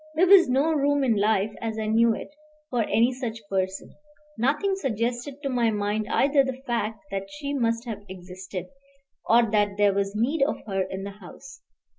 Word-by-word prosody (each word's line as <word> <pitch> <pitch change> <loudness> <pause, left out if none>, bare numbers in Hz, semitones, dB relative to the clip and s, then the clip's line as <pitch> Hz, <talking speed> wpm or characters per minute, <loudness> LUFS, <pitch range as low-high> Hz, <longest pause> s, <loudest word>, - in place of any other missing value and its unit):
There 345 +4 +4
was 375 -5 +7
no 280 +6 +2
room 285 -1 +2
in 240 -4 +2
life, 210 0 +1
as 225 -1 -3
I 220 - -2
knew 225 +1 +3
it, - - -9 0.4
for 245 -2 +1
any 235 +4 +2
such 230 -4 -6
person; 190 -1 -3 0.4
nothing 295 - +1
suggested 250 - -3
to 275 - -1
my 240 -3 +2
mind 210 0 -1
either 275 0 +3
the 265 -1 -4
fact 225 0 -2
that 195 0 -4
she 290 -1 -5
must 230 -3 0
have 220 -3 -5
existed, 185 0 -7 0.6
or 235 +1 +6
that 205 -2 +1
there 205 -1 +4
was 200 +1 -1
need 265 +8 0
of 280 - -2
her 195 -3 -1
in 190 +1 -4
the 200 - -5
house. 210 +7 -13
230 Hz, 185 wpm, -25 LUFS, 205-270 Hz, 0.6 s, was